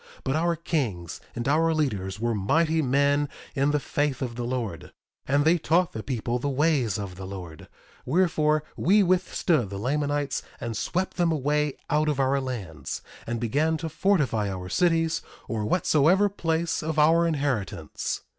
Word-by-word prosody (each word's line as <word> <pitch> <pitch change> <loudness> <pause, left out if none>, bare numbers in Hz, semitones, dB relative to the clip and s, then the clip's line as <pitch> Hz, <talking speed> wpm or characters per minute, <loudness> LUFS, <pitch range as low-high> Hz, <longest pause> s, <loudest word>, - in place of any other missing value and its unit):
But 135 - 0
our 170 +2 +1
kings 120 - -3
and 120 +1 -3
our 160 +3 +3
leaders 100 -11 -1
were 120 +1 0
mighty 160 - +2
men 140 +1 +2 0.2
in 140 +1 +2
the 150 0 +2
faith 145 -1 -1
of 120 -2 -3
the 120 0 -3
Lord; 120 -8 -4 0.4
and 145 +2 +2
they 170 +2 +4
taught 170 +3 +2
the 110 - -5
people 120 -1 -2
the 145 - -1
ways 135 - +1
of 100 -3 -6
the 95 -1 -7
Lord; 90 -5 -8 0.4
wherefore, 155 -4 +2
we 200 +4 +4
withstood 175 - +1
the 100 - -5
Lamanites 145 +5 -1 0.2
and 115 -1 -4
swept 185 +10 -2
them 175 -2 +2
away 150 -1 0
out 150 +1 +2
of 145 -2 -1
our 135 +1 +2
lands, 105 -12 -5 0.2
and 120 0 -2
began 150 +8 +1
to 160 +1 -4
fortify 150 - +1
our 90 -1 -5
cities, 165 - +2 0.3
or 110 -2 -2
whatsoever 175 - +3
place 165 -3 -1
of 155 0 -3
our 165 +3 +5
inheritance. 130 - -2
145 Hz, 165 wpm, -26 LUFS, 115-160 Hz, 0.4 s, our